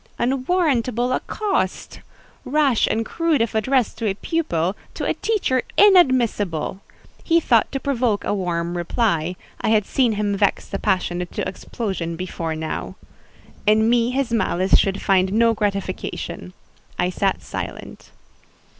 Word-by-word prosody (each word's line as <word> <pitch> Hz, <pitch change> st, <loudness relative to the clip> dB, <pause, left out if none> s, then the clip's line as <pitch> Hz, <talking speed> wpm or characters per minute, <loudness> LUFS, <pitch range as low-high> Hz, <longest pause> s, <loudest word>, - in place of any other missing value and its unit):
Unwarrantable 255 Hz, -3 st, +1 dB
accost!—rash 300 Hz, -, -1 dB
and 225 Hz, 0 st, -1 dB
rude 330 Hz, -3 st, +3 dB
if 230 Hz, 0 st, 0 dB
addressed 235 Hz, +1 st, +1 dB
to 225 Hz, -, -1 dB
a 195 Hz, -, -2 dB
pupil; 195 Hz, -, -1 dB, 0.2 s
to -, -, -3 dB
a -, -, +1 dB
teacher 380 Hz, -, 0 dB, 0.2 s
inadmissible. 240 Hz, -, +3 dB, 0.4 s
He 335 Hz, 0 st, +3 dB
thought 235 Hz, -8 st, +2 dB
to 270 Hz, -, -2 dB
provoke 250 Hz, -6 st, 0 dB
a -, -, -1 dB
warm 175 Hz, -3 st, -2 dB
reply; 175 Hz, -2 st, 0 dB, 0.3 s
I -, -, 0 dB
had 215 Hz, -2 st, +3 dB
seen 245 Hz, -1 st, +2 dB
him 205 Hz, -1 st, -1 dB
vex 200 Hz, 0 st, +1 dB
the 195 Hz, -, -4 dB
passionate 180 Hz, -1 st, -1 dB
to -, -, -2 dB
explosion 185 Hz, -4 st, -4 dB
before 165 Hz, -2 st, -4 dB
now. 160 Hz, 0 st, -4 dB, 0.7 s
In 215 Hz, +1 st, +4 dB
me 240 Hz, -1 st, +3 dB
his 260 Hz, -1 st, -1 dB
malice 190 Hz, -5 st, +2 dB
should 195 Hz, 0 st, +1 dB
find 190 Hz, -1 st, +3 dB
no 230 Hz, +1 st, +4 dB
gratification; 200 Hz, -3 st, -3 dB, 0.4 s
I 180 Hz, +1 st, +1 dB
sat 195 Hz, +1 st, -1 dB
silent. -, -, -7 dB
220 Hz, 135 wpm, -22 LUFS, 185-255 Hz, 0.7 s, In